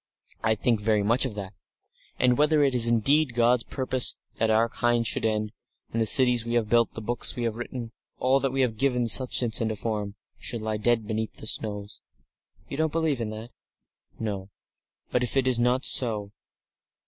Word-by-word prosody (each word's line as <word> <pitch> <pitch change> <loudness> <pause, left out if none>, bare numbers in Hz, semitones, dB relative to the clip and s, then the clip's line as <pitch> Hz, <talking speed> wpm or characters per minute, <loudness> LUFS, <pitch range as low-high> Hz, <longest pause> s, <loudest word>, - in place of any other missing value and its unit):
I 110 - +1
think 110 +1 0
very 105 -1 +1
much 115 +6 +2
of 110 - -9
that, 100 -1 -7 0.6
and 125 -1 +2
whether 150 +2 +3
it 135 -2 +1
is 120 -2 +5
indeed 125 +4 +2
God's 120 0 +2
purpose 130 -2 -1 0.2
that 115 - 0
our 110 +1 +3
kind 120 0 0
should - - 0
end, 110 -1 -1 0.4
and 115 - -2
the 110 - +1
cities 125 -2 +7
we 115 +1 -3
have 115 -3 0
built, 115 0 +2
the 115 - -7
books 120 +3 0
we 120 - -4
have 115 -2 -1
written, 120 -1 -7 0.3
all 130 +2 +2
that 135 -1 -1
we 135 +1 -1
have 115 -4 -1
given 125 -1 0
substance 120 -1 +3
and 110 - -1
a - - -4
form, 105 -1 -4 0.2
should 115 -3 -5
lie 110 -1 -2
dead 115 0 0
beneath 110 +1 -4
the - - -12
snows." 105 -2 -2 0.7
"You 140 - -7
don't 160 0 0
believe 160 -4 -1
that?" 110 +1 -6 0.7
"No. 100 -3 -5 0.6
But 125 - 0
if 125 +2 -2
it 135 - +2
is 130 -2 +2
not 125 +2 +1
so 105 -5 +2
115 Hz, 195 wpm, -25 LUFS, 110-125 Hz, 0.7 s, cities